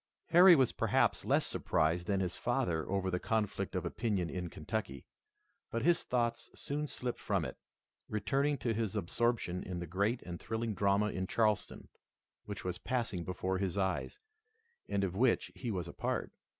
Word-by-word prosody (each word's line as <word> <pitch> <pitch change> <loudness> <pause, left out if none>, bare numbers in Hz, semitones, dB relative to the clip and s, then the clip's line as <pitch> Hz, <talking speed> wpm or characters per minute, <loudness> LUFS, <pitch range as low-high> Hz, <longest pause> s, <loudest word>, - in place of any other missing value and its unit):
Harry 175 +1 +9
was 130 -5 +3
perhaps - - +2
less - - +3
surprised 85 +3 0
than 100 -1 +1
his 90 -2 -1
father 120 - 0
over 95 -1 0
the 90 - 0
conflict 110 -2 -1
of - - -1
opinion 100 -7 -1
in 90 -2 -3
Kentucky, 75 - -4 0.6
but 115 0 -2
his 170 +2 +4
thoughts 120 -2 -1
soon 150 +1 -3
slipped 125 -3 -4
from - - 0
it, - - -5 0.5
returning 135 +8 +1
to 120 -4 -1
his 110 -2 -2
absorption 105 -1 0
in 90 -1 -5
the 85 - -3
great 100 +8 0
and 85 -1 -6
thrilling 115 0 -2
drama 100 +1 +2
in 95 0 -3
Charleston, 110 -1 0 0.6
which 105 -2 -6
was 90 -1 -3
passing 115 -8 -1
before 95 +2 -2
his 95 -2 -1
eyes, 95 - -1 0.7
and 100 -1 +1
of 95 -1 -1
which 120 +3 +2
he 125 - -5
was 90 -6 -2
a - - -8
part. - - -2
100 Hz, 170 wpm, -33 LUFS, 90-120 Hz, 0.7 s, Harry